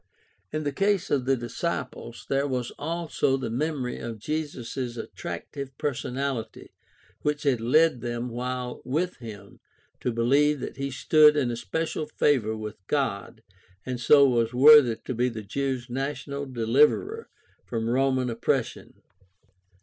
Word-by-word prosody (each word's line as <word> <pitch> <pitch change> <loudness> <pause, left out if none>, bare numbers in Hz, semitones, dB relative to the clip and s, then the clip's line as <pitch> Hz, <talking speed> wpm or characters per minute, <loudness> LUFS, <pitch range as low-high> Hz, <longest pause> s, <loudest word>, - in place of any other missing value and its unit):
In 155 - -2
the 145 - -1
case 195 +4 0
of 135 -3 +1
the 135 0 +2
disciples 120 0 -4
there 140 +1 +1
was 125 -3 -2
also 160 -4 0
the 130 - -4
memory 135 0 -2
of 115 -1 -6
Jesus' 130 -2 -4
attractive 135 +3 -7
personahty 130 -4 -3 0.5
which 150 +1 -1
had 130 -6 +1
led 140 +2 +3
them 120 0 -3
while 125 +1 -4
with 165 +7 -1
him 105 -5 -11 0.4
to 125 - -1
believe 140 +6 +3
that - - -6
he 140 0 -2
stood 150 +3 +5
in 130 -4 +1
especial 155 +6 -3
favor 125 -8 +1
with 105 0 -6
God 110 -6 -2 0.4
and 125 -1 -3
so 140 +2 +7
was 120 -1 +1
worthy 140 -3 +8
to 130 - -6
be 125 +1 +1
the 110 -2 -7
Jews' 130 +3 -2
national 140 +2 -4
deliverer 140 - +2 0.4
from 115 -1 -2
Roman 130 0 +1
oppression. 115 - -2
130 Hz, 135 wpm, -26 LUFS, 120-145 Hz, 0.5 s, worthy